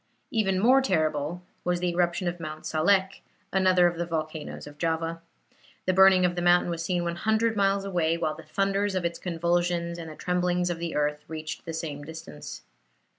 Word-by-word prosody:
Even 195 -5 +1
more 255 +6 +5
terrible 155 - 0 0.2
was 175 0 0
the 180 0 0
eruption 175 +1 0
of 175 0 -3
Mount 155 -1 -7
Salek, 190 +4 +2 0.3
another 185 -2 +4
of 175 -1 +1
the 175 - -1
volcanoes 155 -2 -4
of 145 0 -12
Java. 165 +1 -1 0.6
The 185 - +2
burning 190 -1 +6
of 175 - +1
the 175 - -2
mountain 175 0 +4
was 165 -1 -3
seen 175 0 0
100 220 +6 +1
miles 195 -1 +2
away, 170 -4 +1
while 160 -2 -1
the 160 - -10
thunders 195 +4 0
of 185 -2 -1
its 170 - -2
convulsions 170 0 0
and 165 -1 -7
the 155 - -9
tremblings 180 0 0
of 170 - -4
the 170 -1 -4
earth 150 0 0
reached 155 -1 -6
the 165 - -5
same 160 -3 -4
distance. 145 - -9
175 Hz, 185 wpm, -27 LUFS, 160-185 Hz, 0.6 s, burning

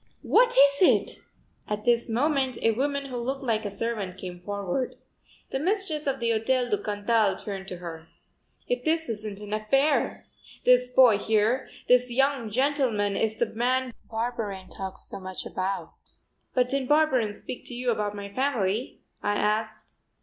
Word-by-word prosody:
What 485 0 +4
is 280 +1 +6
it?" 370 - +3 0.5
At 210 0 -3
this 235 0 +2
moment 265 +1 +1
a 225 - +5
woman 280 +4 -1
who 255 -2 -5
looked 265 +3 -3
like 220 -4 0
a - - -1
servant 200 -2 -3
came 180 -2 -7
forward. 200 +6 -3 0.6
The 265 - -1
mistress 350 -3 0
of 270 -1 0
the 235 -1 +1
Hotel 245 +3 +1
du 205 - +1
Cantal 205 -1 +1
turned 195 -1 -6
to 180 - -6
her: 165 -2 -8 0.6
"If - - -1
this 320 0 +1
isn't 210 -2 -4
an 210 0 -6
affair! 270 +8 +1 0.4
This 250 0 +5
boy 245 -5 +6
here, 220 +5 +1 0.2
this 250 0 +5
young 270 -2 +1
gentleman, 245 -5 +1
is 220 0 0
the 235 - +1
man 250 +2 0 0.2
Barberin 220 -5 -3
talked 190 -1 -6
so - - -8
much 185 -1 -6
about." 190 +1 -3 0.6
"But 250 -1 +3
didn't 270 -1 -1
Barberin 265 -9 +3
speak 245 - -8
to 245 - -5
you 245 0 0
about 210 -2 -2
my 200 0 -7
family?" 240 -4 -1 0.2
I 205 - 0
asked. 215 +1 -1
230 Hz, 165 wpm, -27 LUFS, 205-265 Hz, 0.6 s, is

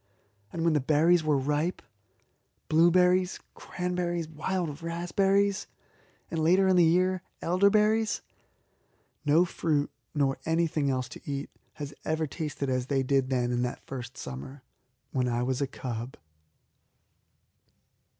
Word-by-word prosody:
And 165 - -3
when 165 -1 +3
the 150 - +3
berries 160 +5 +4
were 150 -2 +2
ripe 150 +6 -1 0.9
blueberries, 180 +3 +4
cranberries, 180 -2 -3
wild 160 0 -3
raspberries, 195 +4 +1 0.6
and, 160 -1 -1
later 185 +4 +4
in 190 - +4
the 175 - +6
year, 185 +2 +3 0.2
elderberries 210 +5 +2 1.0
no 155 +5 +5
fruit, 155 -4 -1 0.2
nor 140 -2 +1
anything 160 -3 +1
else 130 -2 -1
to - - -10
eat, 140 +1 -4 0.2
has 145 -1 -7
ever 160 0 0
tasted 150 -2 -4
as 130 -1 -1
they 135 -1 +1
did 135 0 +1
then 125 -2 0
in 120 0 0
that 125 0 -4
first 130 -1 -7
summer 70 - -8 0.5
when 125 -2 0
I 120 0 0
was 130 +2 -1
a 140 - +1
cub. 125 -1 -6
155 Hz, 130 wpm, -28 LUFS, 135-180 Hz, 1.0 s, the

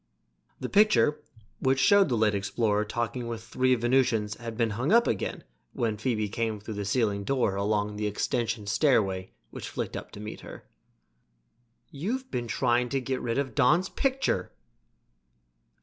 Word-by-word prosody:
The - - -3
picture, 210 -7 +4 0.4
which 130 0 +2
showed 195 +6 +5
the 120 - +1
late 110 -1 +3
explorer 105 +1 0
talking 120 +2 -3
with 115 -1 -5
three 130 +2 +2
Venusians, 120 -3 +1
had 115 -2 -7
been 115 -2 +1
hung 120 - -1
up 235 +1 +6
again 105 - -2 0.3
when 115 -3 -1
Phoebe 110 -1 -1
came 110 0 -2
through 105 +2 -7
the 100 -1 -4
ceiling 100 -1 0
door 125 -3 +1
along 105 +1 -1
the 105 0 -1
extension 115 +1 -1
stairway 100 -5 +2 0.2
which - - -7
flicked - - -4
up - - -6
to - - -9
meet 105 +1 -7
her. - - -11 1.3
"You've 240 - -4
been 120 -1 -2
trying 120 +2 +1
to 135 - 0
get 130 0 -3
rid 115 0 -2
of 140 -1 -1
Don's 155 +7 +3
picture!" 265 - 0
115 Hz, 160 wpm, -28 LUFS, 105-130 Hz, 1.3 s, up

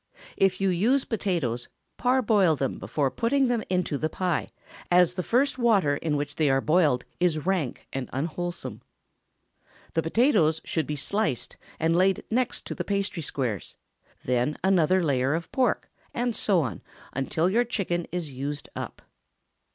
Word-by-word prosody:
If 190 -1 +2
you 195 0 +2
use 230 +10 +2
potatoes, 170 - -1 0.3
parboil 220 -9 +3
them 135 -2 -2
before 140 -3 -1
putting 265 +3 +2
them 240 -2 +1
into 180 -6 0
the 155 - 0
pie, 180 -3 -1 0.4
as 180 -1 +5
the 180 - -2
first 260 +7 +1
water 200 - +3
in 150 -1 -1
which 145 0 -4
they 155 -3 +3
are 135 0 +3
boiled 150 -4 +2
is 170 -4 +1
rank 180 -9 -1
and 135 -2 -3
unwholesome. 170 +5 -4 1.1
The 165 - +2
potatoes 165 - +3
should 160 -5 -1
be 150 - -2
sliced 150 - -1 0.2
and 165 +1 +2
laid 190 +2 +3
next 250 +2 -1
the - - -3
pastry 200 -3 -1
squares; 125 - -3 0.5
then 125 +4 +1
another 185 -1 +3
layer 135 -1 +1
of 165 0 -5
pork, 260 -2 +1 0.3
and 240 -1 0
so 190 -5 +2
on 120 - -4 0.3
until 145 +5 0
your 225 +6 +3
chicken 190 -8 -2
is 175 -5 -3
used 140 +3 -5
up. - - -6
175 Hz, 150 wpm, -26 LUFS, 145-200 Hz, 1.1 s, as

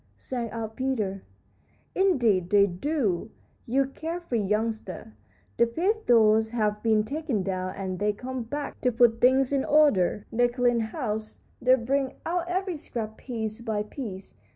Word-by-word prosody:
sang 240 -3 -4
out 220 0 -5
Peter. 215 -8 -1 0.7
"Indeed 240 - +2
they 200 0 +6
do, 205 - -1 0.4
you 270 +4 +2
care 320 +6 -5
free 250 -10 -2
youngster. 210 - -2 0.4
The 235 - +4
pith 385 - -1
doors 220 -2 +5
have 210 -3 -1
been 220 -2 +3
taken 275 -4 -2
down, 185 -1 -3
and 190 -2 -4
they 210 +1 +2
come 255 +4 -5
back 285 +6 -5
to 250 - +2
put 235 -1 +3
things 260 +2 +4
in 275 -1 +2
order. 210 - +3
They 245 +2 +3
clean 245 -1 +1
house; 220 -1 -3 0.2
they 255 +1 +6
bring 265 +2 -1
out 345 +1 -1
every 365 -1 -2
scrap 220 -6 -5
piece 225 -3 -4
by 220 -3 -1
piece. 210 -4 -7
230 Hz, 155 wpm, -27 LUFS, 210-270 Hz, 0.7 s, they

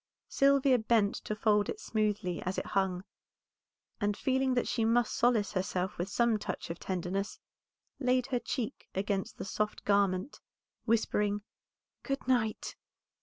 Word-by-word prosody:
Sylvia 275 -2 +4
bent 220 -2 +3
to 215 - -2
fold 210 -1 +2
it 430 - -4
smoothly 210 - -1
as 185 +1 -3
it - - -2
hung, 190 -2 0 1.0
and 205 -1 0
feeling 265 -1 +1
that 245 - +1
she 230 - 0
must 230 0 +2
solace 235 -4 +2
herself 185 -1 -2
with 180 +3 -2
some 235 +1 +2
touch 205 - -4
of 170 - -7
tenderness, 190 +2 -3 0.6
laid 255 -2 +2
her 245 - +3
cheek 250 +1 -4
against 195 0 -1
the - - -5
soft 210 +1 -2
garment, 200 +3 +1 0.5
whispering 210 -2 +1 0.6
"Good 275 -2 -3
night." 230 -4 0
215 Hz, 140 wpm, -31 LUFS, 195-245 Hz, 1.0 s, Sylvia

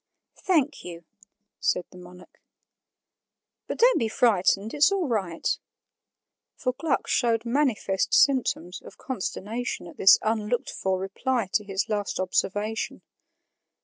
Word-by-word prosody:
"Thank 325 -8 +1
you," 170 -1 -9 0.6
said 180 - 0
the 180 - -14
monarch. 180 0 -15 1.3
"But - - -4
don't - - +5
be 230 - 0
frightened; 210 -2 +2
it's 295 +5 +4
all 385 -5 0
right" 190 -8 -1 1.0
for 255 - -2
Gluck 320 +3 -1
showed 230 -2 +1
manifest 235 -7 0
symptoms 210 - +2
of - - -14
consternation 230 -2 -4
at 170 - -12
this 195 - +7
unlooked 225 +4 -1
for 190 -1 -1
reply 195 +3 -2
to 210 - +2
his 195 +1 -2
last 205 -4 -2
observation. 205 +4 -2
215 Hz, 120 wpm, -26 LUFS, 190-255 Hz, 1.3 s, this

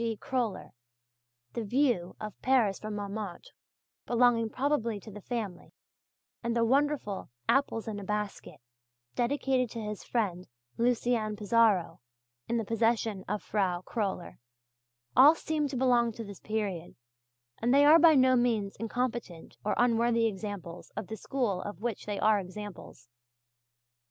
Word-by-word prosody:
G. 225 -2 -1
Kröller, 235 -7 -3 0.8
the 235 - -3
"View 225 -6 +1
of 215 -2 -6
Paris 240 -7 +2
from 215 -1 -5
Montmartre," 205 - -6 0.6
belonging 235 -2 +3
probably 240 -5 0
to 215 - -11
the 210 +1 -10
family, 210 -6 -5 0.7
and 235 0 -1
the 230 -1 +3
wonderful 270 -5 0 0.2
"Apples 250 -5 +1
in 210 -2 -4
a - - -7
Basket" 210 0 -4 0.5
dedicated 255 0 +1
to 230 - -6
his 210 -2 -5
friend 185 -7 -2 0.3
Lucien 235 -2 +1
Pissaro, 210 -4 +2 0.5
in 235 - 0
the 225 - -1
possession 225 -2 0
of 210 +1 -2
Frau 185 -4 0
Kröller 200 -6 -3 0.8
all 285 +6 +8
seem 310 -2 -1
to 270 -2 -4
belong 240 -2 +3
to 230 - -6
this 200 -3 -10
period; 205 -6 -3 0.6
and 235 +2 +1
they 280 +2 +6
are 310 +3 +8
by 325 -2 +7
no 260 -1 +5
means 225 -5 +1
incompetent 230 -6 -4
or 210 - 0
unworthy 235 -1 +3
examples 195 -5 -5
of 215 - -4
the 220 - -4
school 220 -4 -2
of 205 +1 -7
which 235 -4 -3
they 205 -1 -2
are 215 -1 +4
examples. 190 - -9
225 Hz, 140 wpm, -30 LUFS, 205-245 Hz, 0.8 s, all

